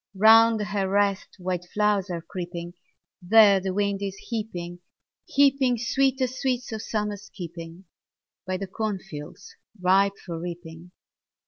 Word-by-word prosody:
Round 225 +2 +6
her 200 -2 -2
rest 200 0 +1
wild 180 -1 -4
flowers 210 -2 +1
are 170 -2 -4
creeping; 175 -1 -6 0.5
There 200 +1 +6
the 190 0 -3
wind 200 0 -1
is 195 -1 -3
heaping, 180 -7 -5 0.5
heaping 275 -3 +3
Sweetest 260 +1 0
sweets 250 -3 -1
of 220 -1 -4
Summer's 210 -2 -4
keeping. 170 0 -9 0.6
By 185 0 -1
the 195 - -4
corn 210 +1 -3
fields 175 +1 -10 0.2
ripe 195 +2 +3
for 170 -3 -7
reaping. 170 0 -8
195 Hz, 130 wpm, -25 LUFS, 180-220 Hz, 0.6 s, Round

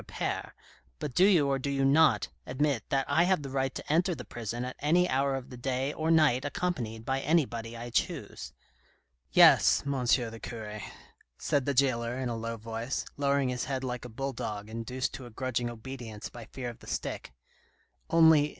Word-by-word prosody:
Appert, - - -4 0.4
but 135 - -5
do 180 - +5
you 175 -8 +5
or 135 -1 +1
do 140 - -3
you 135 -1 +1
not 135 - +4 0.2
admit 140 -2 0
that 135 -1 +1
I 160 +5 +3
have 185 -5 +2
the 135 - -6
right 135 -1 -1
to - - -3
enter 175 +2 +2
the 125 - -8
prison 120 +1 -4
at 130 - -6
any 175 +5 +3
hour 135 -1 +1
of 135 -1 -6
the 125 - -8
day 130 +3 -1
or 160 0 -2
night 155 -6 +4
accompanied 125 -8 -3
by 135 +1 0
anybody 120 -7 0
I 120 +1 -7
choose? - - -2 0.3
" - - -36
" - - -46
Yes, - - +6
M. 140 - -1
the 115 -2 +1
cure," 105 -3 -6 0.6
said 140 -3 0
the 140 - +1
jailer 120 -2 +2
in 130 -2 -2
a 120 - -2
low 115 0 -4
voice, 115 +3 -4
lowering 140 -2 +1
his 125 -1 -2
head 130 -1 -3
like 125 -2 -3
a 125 - -7
bull 135 +4 -4
dog, 105 -2 -5
induced 125 +3 -3
to 130 - -7
a - - -10
grudging 120 0 -2
obedience 120 -2 -7
by 120 -2 -10
fear 125 +1 -6
of 120 - -16
the - - -15
stick, - - -4 0.3
' - - -36
' - - -42
only, 160 -3 +6
M. - - -9
130 Hz, 210 wpm, -29 LUFS, 115-140 Hz, 0.6 s, Yes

